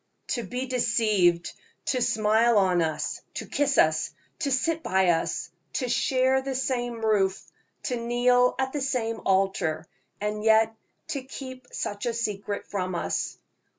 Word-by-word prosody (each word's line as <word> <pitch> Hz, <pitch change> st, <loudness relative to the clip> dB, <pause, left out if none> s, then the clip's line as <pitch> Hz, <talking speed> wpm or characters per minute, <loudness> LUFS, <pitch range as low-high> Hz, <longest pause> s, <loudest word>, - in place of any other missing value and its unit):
"To 240 Hz, -, 0 dB
be 250 Hz, +5 st, -4 dB
deceived 215 Hz, -8 st, +2 dB, 0.3 s
to 255 Hz, -, 0 dB
smile 220 Hz, +1 st, +3 dB
on 185 Hz, -3 st, +3 dB
us, 155 Hz, -2 st, -2 dB
to -, -, -4 dB
kiss 280 Hz, -2 st, 0 dB
us, 155 Hz, 0 st, +3 dB, 0.3 s
to 285 Hz, -, 0 dB
sit 325 Hz, +5 st, +1 dB
by 190 Hz, -, +2 dB
us, 165 Hz, -1 st, 0 dB, 0.2 s
to 255 Hz, -, -1 dB
share 260 Hz, +2 st, +2 dB
the 265 Hz, 0 st, -3 dB
same 245 Hz, -3 st, -1 dB
roof, 195 Hz, -3 st, +2 dB, 0.4 s
to 250 Hz, -, -1 dB
kneel 245 Hz, +1 st, +3 dB
at 265 Hz, 0 st, -1 dB
the 295 Hz, -, -2 dB
same 230 Hz, -4 st, -1 dB
altar, 190 Hz, -5 st, +1 dB, 0.3 s
and 210 Hz, 0 st, -2 dB
yet 220 Hz, 0 st, +5 dB, 0.4 s
to 280 Hz, -, -2 dB
keep 260 Hz, -1 st, -9 dB
such 205 Hz, +3 st, -3 dB
a 235 Hz, -, -1 dB
secret 205 Hz, -3 st, -3 dB
from 185 Hz, -2 st, -3 dB
us! 170 Hz, -, -2 dB
230 Hz, 150 wpm, -26 LUFS, 195-255 Hz, 0.4 s, yet